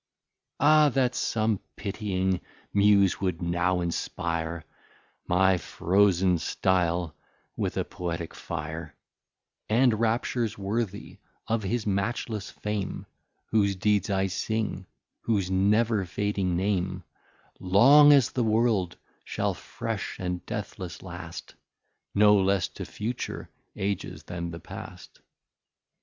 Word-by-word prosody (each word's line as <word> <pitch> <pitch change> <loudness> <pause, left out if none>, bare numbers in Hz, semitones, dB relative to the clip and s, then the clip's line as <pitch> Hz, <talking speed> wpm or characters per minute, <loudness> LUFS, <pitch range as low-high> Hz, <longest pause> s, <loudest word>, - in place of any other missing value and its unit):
Ah 150 +1 +6
that 125 -2 +1
some 110 -4 0 0.2
pitying 95 -3 -1 0.3
Muse 100 -2 +4
would 90 -4 -1
now 90 +1 0
inspire 85 -1 -3 0.6
My 95 +1 +3
frozen 95 +1 +2
style 85 -2 0 0.4
with - - -2
a - - 0
Poetique 85 -2 -5
fire, 80 -1 -6 0.7
And 115 0 +3
Raptures 115 0 0
worthy 100 +1 -3 0.3
of 115 0 0
his 105 +3 -2
Matchless 105 +1 -2
Fame, 105 -2 -4 0.5
Whose 100 -3 +3
Deeds 105 +1 +1
I 95 -1 +1
sing, 100 0 -2 0.3
whose 100 -5 0
never 105 +3 +3
fading 95 -1 -1
Name 95 -1 -1 0.6
Long 135 +11 +7
as 140 -6 +5
the 125 - 0
world 110 -5 +1 0.3
shall - - -1
fresh - - -5
and 90 -1 -3
deathless 90 -2 -6
last, 85 -2 -8 0.6
No 105 0 +6
less 95 -2 +2
to - - -7
future 115 +4 -5 0.2
Ages, 100 -1 -3
then 85 -1 -5
the 85 0 -7
past. - - -10
95 Hz, 110 wpm, -27 LUFS, 90-110 Hz, 0.7 s, Long